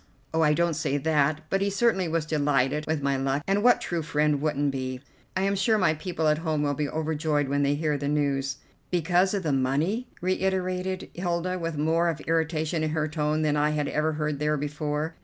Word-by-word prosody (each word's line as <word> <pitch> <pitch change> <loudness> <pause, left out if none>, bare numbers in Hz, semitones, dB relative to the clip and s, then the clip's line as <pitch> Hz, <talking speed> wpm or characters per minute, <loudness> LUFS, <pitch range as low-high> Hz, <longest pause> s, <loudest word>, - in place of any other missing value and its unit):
"Oh, 160 - +2
I 150 -1 +4
don't 170 0 +2
say 150 -2 -1
that, 150 0 +1
but 195 - +1
he 200 - +2
certainly 200 -3 +2
was 165 -1 -1
delighted 145 -1 +1
with 155 -2 -1
my 140 -1 +1
luck, 135 +2 -1
and 195 +1 +1
what 245 +2 +5
true 170 -2 -2
friend 150 -2 +1
wouldn't 145 -2 0
be? 130 -1 -4 0.4
I 190 - +1
am 200 +1 +1
sure 215 +3 +2
my 185 -6 +3
people 160 0 -2
at 150 0 +3
home 155 -3 -1
will 145 -1 +1
be 145 0 -2
overjoyed 155 -2 -1
when 140 +1 0
they 140 0 +2
hear 150 -1 -1
the 140 - -3
news." 140 -2 0 0.3
"Because 180 +3 +2
of 195 - -2
the 150 -3 0
money?" 150 - 0
reiterated 185 0 -1
Hilda, 175 +1 -2
with 165 -2 -3
more 165 +3 +2
of 160 -3 -3
irritation 160 0 0
in 155 - 0
her 155 0 0
tone 155 0 0
than 150 -1 +2
I 150 0 +2
had 150 -1 -1
ever 155 +1 0
heard 150 -1 -2
there 150 0 +1
before. 150 +2 -3
155 Hz, 215 wpm, -26 LUFS, 145-170 Hz, 0.4 s, what